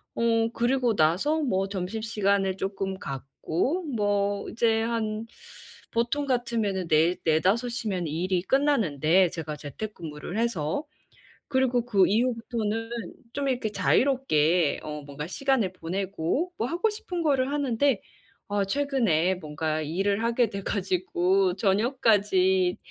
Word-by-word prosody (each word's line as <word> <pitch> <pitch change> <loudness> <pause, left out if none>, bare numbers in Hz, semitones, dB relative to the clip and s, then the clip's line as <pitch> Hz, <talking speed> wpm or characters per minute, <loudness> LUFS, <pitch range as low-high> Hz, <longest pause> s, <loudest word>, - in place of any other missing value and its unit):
어 230 -1 +2
그러고 240 -2 +1
나서 185 - +2
뭐 195 -8 0
점심시간을 200 0 -1
쪼끔 195 -1 -3
갖고 160 - -2
뭐 205 -5 0
이제 225 -1 +2
한 225 -1 -2 0.7
보통 240 +5 0
같으면은 230 -8 -1
네 160 +3 +3
4-5 190 +10 +2
시면 205 -8 -2
일이 175 +4 -1
끝나는데 190 - +3
제가 155 -2 -5
재택근무를 165 - -6
해서. 230 - -1 0.7
그리고 255 -3 +2
그 200 -6 +4
이후부터는 225 -1 -1 0.4
좀 280 -1 -2
이렇게 245 -4 -1
자유롭게 180 - +2
어 150 -1 -6
뭔가 145 +2 -6
시간을 255 -3 0
보내고 190 - -2
뭐 230 - -1
하고 350 +9 +1
싶은 415 -6 -4
거를 275 -2 +2
하는데 275 -4 +1 0.5
아 205 -1 +1
최근에 215 - +1
뭔가 155 -1 -3
일을 195 +7 0
하게 235 0 +2
돼 200 0 -5
가지고 185 -1 +1
저녁까지 195 -4 +2
205 Hz, 255 characters per minute, -26 LUFS, 180-240 Hz, 0.7 s, 그